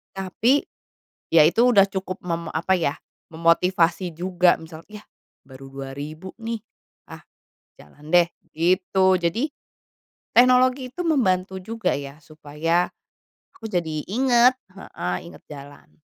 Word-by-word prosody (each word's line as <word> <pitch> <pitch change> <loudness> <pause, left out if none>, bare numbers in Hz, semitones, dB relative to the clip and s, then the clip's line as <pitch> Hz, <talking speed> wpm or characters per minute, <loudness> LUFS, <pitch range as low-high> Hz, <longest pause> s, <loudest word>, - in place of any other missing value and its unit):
Tapi 215 +9 +1 0.6
ya 160 -2 +6
itu 170 +8 +2
udah 205 -5 +6
cukup 190 -1 -5
mem 170 -2 -3
apa 180 +3 +1
ya, 145 -3 -1 0.4
memotivasi 170 +1 +1
juga 180 0 +2
misal 160 0 -12
"Yah 210 0 -12 0.4
baru 135 0 -13
2000 140 +6 -8
nih, 225 -1 -5 0.5
ah - - -9 0.6
jalan 145 - -16
deh," 175 0 +5 0.2
gitu. 185 +2 +2
Jadi, 235 - -1 0.8
teknologi 255 +1 +4
itu 355 - -9
membantu 190 - +1
juga 225 +3 -2
ya 140 +1 -8
supaya 155 +3 -2 0.7
aku 225 - -12
jadi 160 -4 -2
ingat 245 +3 +4 0.2
heeh, 90 - -5 0.2
ingat 80 - -16
jalan. 145 -1 -12
180 Hz, 120 wpm, -23 LUFS, 155-210 Hz, 0.8 s, ya